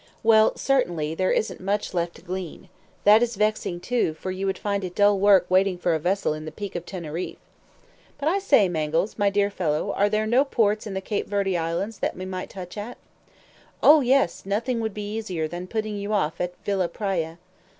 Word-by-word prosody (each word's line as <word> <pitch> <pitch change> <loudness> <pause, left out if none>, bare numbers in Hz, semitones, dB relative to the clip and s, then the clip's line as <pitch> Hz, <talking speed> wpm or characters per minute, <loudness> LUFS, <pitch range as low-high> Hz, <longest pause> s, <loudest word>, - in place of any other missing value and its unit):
"Well, 220 -1 +5
certainly, 175 - 0
there 185 +3 0
isn't - - -1
much 200 +2 -1
left 170 -1 -1
to - - -15
glean. 185 -2 -6 0.3
That 210 +2 +7
is 240 -1 0
vexing, 210 -4 -1
too, 235 -8 0
for 185 +4 -5
you 190 +1 -3
would 195 - -1
find 200 -1 -2
it 180 -1 -5
dull 205 -1 +4
work 195 -2 +5
waiting 185 0 +2
for 175 -1 0
a 160 - 0
vessel 180 +1 0
in 155 0 -7
the 155 - -6
Peak 205 -2 -6
of 175 0 -5
Teneriffe." 170 -2 -5 0.8
"But, 285 - -3
I 375 +5 +2
say, 275 - +4
Mangles, 165 +5 -1
my 205 0 +4
dear 200 0 +1
fellow, 170 +1 -1
are 205 +1 +2
there 215 +1 0
no 240 +5 +4
ports 215 -6 0
in 195 - -5
the 190 - -2
Cape 205 +1 -3
Verde 200 -2 0
Islands 170 +6 -2
that - - -2
we 185 - -5
might 185 -1 -5
touch 185 0 -9
at?" 230 +4 -7 0.9
"Oh, 305 0 +8
yes, 260 -7 +2
nothing 230 +5 -1
would 220 -3 -3
be 210 0 -5
easier 180 -8 -2
than 175 +3 -6
putting 215 0 -3
you 200 +1 -3
off 175 -6 0
at 180 0 -3
Villa 195 -3 +1
Praya." 170 -3 -3
195 Hz, 210 wpm, -24 LUFS, 175-215 Hz, 0.9 s, Oh